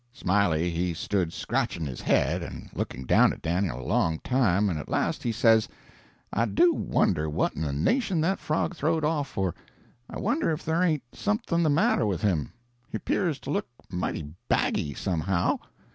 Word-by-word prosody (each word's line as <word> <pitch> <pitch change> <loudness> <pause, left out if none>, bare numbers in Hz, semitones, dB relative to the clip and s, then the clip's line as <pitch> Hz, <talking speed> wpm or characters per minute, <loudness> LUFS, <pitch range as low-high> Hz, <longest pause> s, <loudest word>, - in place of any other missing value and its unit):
"Smiley 90 -6 +1
he 85 0 -1
stood 90 -1 -1
scratching 85 -1 -2
his 65 -4 -5
head - - +2
and - - -8
looking 65 - -4
down - - +5
at - - -9
Dan'l 85 -5 0
a 65 - -7
long 90 - +1
time, 105 -6 +2
and 85 -6 -1
at - - -8
last - - 0
he 120 - -1
says, 115 -1 +4 0.6
'I 115 - +2
do 340 - +4
wonder 80 - +1
what 75 - 0
in - - -5
the 75 -3 -1
nation 185 - +1
that 190 +5 +1
frog 155 +4 -1
throw'd 160 0 0
off 150 -2 0
for 95 -8 -2 0.6
I - - -6
wonder 240 - 0
if 155 0 -2
there 160 +2 +1
ain't 160 -6 +2
something 205 -5 0
the 160 - +3
matter 145 -6 +3
with 95 -4 -2
him 90 -8 +1 0.4
he - - -3
'pears 165 - 0
to - - -5
look 200 - -1 0.2
mighty 90 -2 -2 0.3
baggy, 70 -2 +1
somehow.' 90 -1 0
105 Hz, 180 wpm, -27 LUFS, -, 0.6 s, down